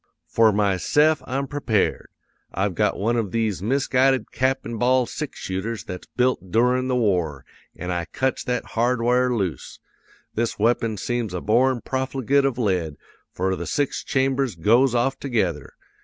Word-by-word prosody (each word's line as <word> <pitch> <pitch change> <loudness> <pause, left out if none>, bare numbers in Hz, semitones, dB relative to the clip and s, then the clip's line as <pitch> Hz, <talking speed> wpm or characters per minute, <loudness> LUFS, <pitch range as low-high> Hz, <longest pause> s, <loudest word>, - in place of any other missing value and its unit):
"'For 115 -1 +4
myse'f 105 - +2
I'm 135 +2 -1
prepared. 135 -8 -1 0.4
I've 95 +1 -1
got 105 +3 +1
one 115 +4 0
of 110 -4 -1
these 110 -5 -1
misguided 130 +1 +1
cap 130 +1 0
an' 115 0 -5
ball 125 +2 +3
six 150 +4 -6
shooters 105 +5 -4
that's 90 -1 -8
built 125 -7 +1
doorin' 125 +4 +2
the 130 - 0
war; 90 - 0 0.3
an' 90 +2 -5
I 85 -1 -2
cuts 130 +7 -2
that 125 -1 -1
hardware 125 +1 +2
loose! 95 -8 -3 0.6
This 115 +1 -1
weapon 115 0 +1
seems 115 -2 -2
a - - -1
born 120 +3 +2
profligate 135 +1 0
of 135 -3 0
lead, 90 - 0 0.4
for 95 +1 -1
the - - -6
six 145 -2 -1
chambers 135 -3 0
goes 120 +9 +3
off 135 +3 +1
together. 95 - -2
120 Hz, 155 wpm, -23 LUFS, 100-130 Hz, 0.6 s, For